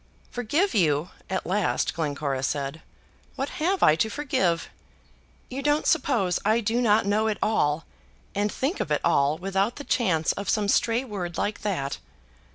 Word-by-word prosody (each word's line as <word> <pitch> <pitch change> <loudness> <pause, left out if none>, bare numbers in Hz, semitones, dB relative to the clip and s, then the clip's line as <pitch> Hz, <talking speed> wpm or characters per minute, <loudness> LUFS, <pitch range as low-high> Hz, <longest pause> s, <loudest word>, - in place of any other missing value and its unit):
"Forgive 290 - 0
you!" 160 -4 +2 0.2
at 190 - -2
last 195 +2 0
Glencora 145 -4 -2
said. 140 +3 -2 0.5
"What 270 +2 -2
have 375 +4 +1
I 155 - +6
to 220 - +1
forgive? 220 - 0 0.8
You 265 +2 -5
don't 295 +2 +1
suppose 200 - +2
I 220 +3 +3
do 230 +2 0
not 215 -2 +3
know 210 +2 +2
it 215 - 0
all, 155 -8 +1 0.5
and 205 +1 0
think 280 +8 -2
of - - -2
it 150 - +1
all 140 +2 +3
without 195 +5 0
the 290 - -7
chance 180 - +1
of 200 -1 -5
some 210 -2 +1
stray 230 +4 +2
word 185 -7 -5
like 210 - -2
that! 155 -10 -2
205 Hz, 165 wpm, -26 LUFS, 165-235 Hz, 0.8 s, I